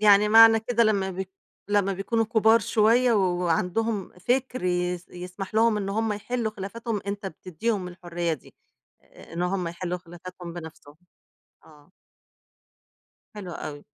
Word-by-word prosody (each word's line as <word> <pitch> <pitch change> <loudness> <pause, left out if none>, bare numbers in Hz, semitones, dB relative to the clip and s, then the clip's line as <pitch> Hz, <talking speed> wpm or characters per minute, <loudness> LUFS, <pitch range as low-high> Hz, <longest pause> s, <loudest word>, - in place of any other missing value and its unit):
يعني 210 0 +6
معنى 225 0 +8
كده 235 +1 +1
لمّا 195 -3 +1
بيك 190 +1 -5 0.4
لمّا 200 -1 +2
بيكونوا 225 +4 0
كُبار 220 0 +4
شوية 230 +4 +3
وعَندهم 185 +2 0
فِكر 255 +4 -1
يس 180 0 -1
يسمح 180 +3 -8
لهم 225 -1 +4
إن 200 -1 -3
هُم 220 +1 0
يحِلّوا 225 +2 -2
خِلافاتهم، 215 +2 -4
أنت 200 0 -4
بتدّيهم 185 +3 -3
الحرية 175 -1 -3
دي، 150 - -9 0.5
إ - - -17
إن 170 +1 -2
هُم 180 -1 -1
يحِلّوا 180 +1 -4
خلافاتهم 175 0 -10
بنفْسهم. 160 -3 -10 0.7
آه. 150 +2 -20 1.4
حلو 190 -4 -7
أوي. 145 -3 -7
195 Hz, 135 wpm, -26 LUFS, 180-220 Hz, 1.4 s, معنى